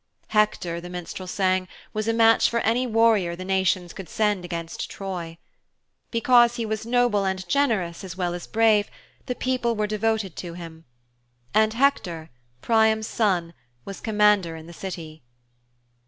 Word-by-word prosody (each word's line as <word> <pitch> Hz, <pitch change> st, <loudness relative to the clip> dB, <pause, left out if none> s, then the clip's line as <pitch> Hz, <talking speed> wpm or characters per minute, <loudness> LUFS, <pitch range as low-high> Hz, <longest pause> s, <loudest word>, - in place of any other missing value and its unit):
Hector, 210 Hz, -5 st, +1 dB
the 175 Hz, -, -9 dB
minstrel 180 Hz, +1 st, -7 dB
sang, 185 Hz, 0 st, 0 dB, 0.3 s
was 215 Hz, 0 st, -2 dB
a -, -, +3 dB
match 225 Hz, 0 st, +5 dB
for 235 Hz, -, 0 dB
any 245 Hz, +3 st, +1 dB
warrior 220 Hz, -6 st, +3 dB
the 185 Hz, +1 st, -7 dB
nations 190 Hz, -2 st, 0 dB
could 190 Hz, -4 st, -9 dB
send 210 Hz, -4 st, 0 dB
against 170 Hz, -2 st, -5 dB
Troy. 175 Hz, -4 st, -6 dB, 0.7 s
Because 240 Hz, 0 st, +4 dB
he 235 Hz, -2 st, -2 dB
was 220 Hz, +1 st, -4 dB
noble 240 Hz, -4 st, +2 dB
and 190 Hz, -1 st, -2 dB
generous 200 Hz, -10 st, 0 dB
as 185 Hz, -2 st, -8 dB
well 175 Hz, -2 st, -1 dB
as 175 Hz, -1 st, -7 dB
brave, 220 Hz, -2 st, +3 dB, 0.4 s
the 250 Hz, -, -2 dB
people 250 Hz, -2 st, 0 dB
were 210 Hz, 0 st, 0 dB
devoted 215 Hz, -3 st, -1 dB
to 170 Hz, -2 st, -6 dB
him. 165 Hz, -2 st, -10 dB, 0.7 s
And 220 Hz, +1 st, +3 dB
Hector, 180 Hz, -, 0 dB, 0.3 s
Priam's 220 Hz, -1 st, +3 dB
son, 180 Hz, -7 st, 0 dB, 0.3 s
was 195 Hz, -, -7 dB
commander 210 Hz, -6 st, +2 dB
in 160 Hz, 0 st, -10 dB
the 170 Hz, -, -11 dB
City. 165 Hz, -4 st, -7 dB
200 Hz, 155 wpm, -24 LUFS, 175-225 Hz, 0.7 s, match